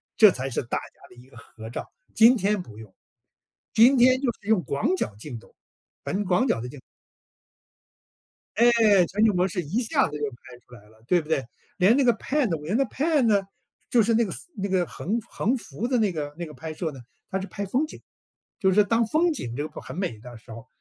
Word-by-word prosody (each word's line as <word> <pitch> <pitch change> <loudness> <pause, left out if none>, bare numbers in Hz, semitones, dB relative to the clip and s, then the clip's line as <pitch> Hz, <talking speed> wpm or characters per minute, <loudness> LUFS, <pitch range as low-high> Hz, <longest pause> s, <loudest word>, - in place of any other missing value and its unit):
这 215 -2 +8
才 135 -2 -4
是 115 - -2
大 120 - -3
家 - - -11
的 - - -17
一 120 +1 -16
个 130 -3 -17
合 110 -1 -11
照。 - - -7 0.2
今 230 +3 +6
天 205 -1 0
不 110 -11 -13
用， 110 -3 -12 0.8
今 245 +5 +6
天 255 +2 +5
就 250 -4 +1
是 205 - -17
用 220 -5 +3
广 140 +7 0
角 105 - -3
镜 115 +3 -8
头 - - -21 0.5
很 200 +2 -1
广 180 +7 +2
角 115 - 0
的 125 - -6
镜 145 - -11 1.8
诶， 240 +2 +6 0.4
全 210 +3 +1
景 210 -3 +3
模 180 +1 +2
式 180 -1 -3
一 200 - -2
下 220 - +1
子 150 +1 -6
就 145 - -2
拍 125 0 -15
出 125 - -15
来 105 -3 -15
了， 110 +1 -23
对 175 +2 +3
不 155 - -12
对？ 140 -5 0 0.3
连 195 +7 +4
那 280 - +3
个 240 - +5
PANO 245 - -1
连 185 +8 -1
那 275 - +3
个 225 - -10
PAN 300 0 +1
呢， 205 -2 +4 0.5
就 235 - +5
是 225 +2 +1
那 230 +1 +3
个 190 - -5 0.2
那 200 0 -3
个 185 -2 +1
横 225 +5 -3
横 245 +6 0
幅 210 - -5
的 250 -1 +1
那 210 -3 +2
个 145 -2 -5
那 175 - -3
个 155 - -10
拍 155 +4 -7
摄 160 0 -3
呢， 135 -3 -11 0.3
它 190 - -2
是 195 - -5
拍 200 +2 -5
风 265 +10 0
景。 - - -12 0.6
就 190 -2 +3
是 210 +2 +5
当 230 +2 +1
风 335 +8 +2
景 120 - -5
这 145 +2 -2
个 - - -10
很 130 - -9
美 180 - -3
的 120 +1 -11
时 115 - -19
候， 115 +1 -10
185 Hz, 265 characters per minute, -25 LUFS, 135-230 Hz, 1.8 s, 这